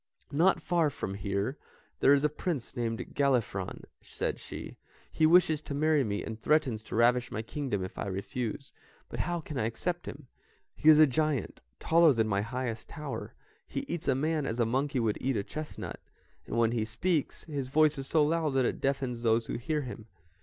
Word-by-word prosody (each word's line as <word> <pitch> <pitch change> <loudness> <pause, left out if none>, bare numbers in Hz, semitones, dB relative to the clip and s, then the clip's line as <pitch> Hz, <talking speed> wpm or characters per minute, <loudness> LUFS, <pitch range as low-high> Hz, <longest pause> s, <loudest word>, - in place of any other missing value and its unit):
"Not 170 +7 +3
far 170 -3 +2
from 95 -8 -5
here 100 +6 -2 0.4
there 140 - +6
is 140 - 0
a 150 - +4
prince 150 -5 -4
named 115 -2 -3
Galifron," 125 -9 0 0.2
said - - -3
she; - - -8 0.4
"he 155 - +3
wishes 165 -2 +5
to 145 - -5
marry 155 -1 +3
me, 105 -3 -2
and 110 0 -7
threatens 135 -8 +2
to - - -6
ravish 120 +2 +3
my 110 - -3
kingdom 120 -6 -3
if 95 - -9
I - - -2
refuse; 115 +7 -4 0.4
but - - -6
how 175 0 -1
can 150 -3 -5
I 110 - +1
accept 175 +9 -3
him? 145 0 -8 0.5
He 155 - +4
is 155 - +9
a 155 - +9
giant, 150 0 -1 0.2
taller 165 -2 +5
than 110 -2 +1
my 100 -2 +1
highest 115 0 -4
tower, 150 -4 -6 0.3
he - - -3
eats 170 -2 -5
a 135 - +3
man 155 +1 0
as 115 - -3
a 115 - +4
monkey 135 +4 0
would 110 -3 0
eat 130 -2 0
a 100 - -1
chestnut, 155 +7 -6 0.5
and - - -3
when 115 -1 +3
he 115 -2 0
speaks, 145 +9 -1
his 140 -5 -4
voice 150 +1 +3
is 135 - -5
so 155 0 +3
loud 155 -2 0
that 130 -2 +3
it - - -2
deafens 130 -3 -1
those 115 0 +2
who - - -5
hear 150 +4 -1
him. 115 -3 -8
135 Hz, 200 wpm, -30 LUFS, 115-155 Hz, 0.5 s, is